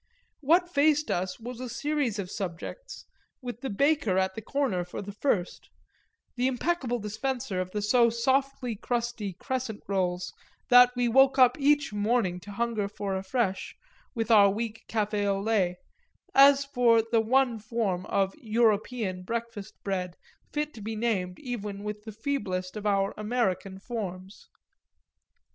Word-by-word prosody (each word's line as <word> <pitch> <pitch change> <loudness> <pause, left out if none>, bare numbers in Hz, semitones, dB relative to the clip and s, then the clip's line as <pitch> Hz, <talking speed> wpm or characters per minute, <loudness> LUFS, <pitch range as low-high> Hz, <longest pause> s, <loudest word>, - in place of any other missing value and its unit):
What 335 +5 +3
faced 300 -2 +2
us 185 +3 -2
was 240 +1 -7
a 255 -1 -5
series 280 -2 -1
of 190 -2 -5
subjects, 195 - -6 0.3
with 245 -3 -7
the 270 - -3
baker, 280 -3 +2
at 190 0 +1
the 220 - -6
corner, 235 -7 -1
for 180 - -8
the 205 0 -6
first 200 -4 -2 0.7
the 250 +1 +1
impeccable 265 -1 -1
dispenser 220 -2 -3
of 185 - -4
the 210 +2 -3
so 235 +2 +4
softly 260 +1 0
crusty 235 -3 -3
crescent 250 +1 -4
rolls 180 -2 -1 0.4
that 245 0 +8
we 245 -1 +1
woke 265 +3 +5
up 255 -2 +6
each 290 -3 +2
morning 205 -3 +1
to 205 +3 -11
hunger 220 -1 -1
for 200 -1 -4
afresh, 195 +1 -2 0.4
with 225 0 -1
our 205 -3 +7
weak 225 +2 -4
café 210 -2 0
au 195 -1 +1
lait, 195 -4 +1 0.6
as 275 0 +7
for 245 -5 +3
the 225 0 +2
one 245 0 +2
form 210 -4 -2
of 195 -1 +1
"European" 220 -4 0
breakfast 225 0 -5
bread 180 -3 -3 0.4
fit 300 0 -2
to 220 - -11
be 220 +2 -4
named 200 -5 -1
even 210 -7 -5
with 210 0 -6
the 220 - -6
feeblest 205 -6 -3
of 210 0 -3
our 195 -1 +1
American 210 -4 -1
forms. 195 -3 -7
225 Hz, 150 wpm, -28 LUFS, 195-250 Hz, 0.7 s, that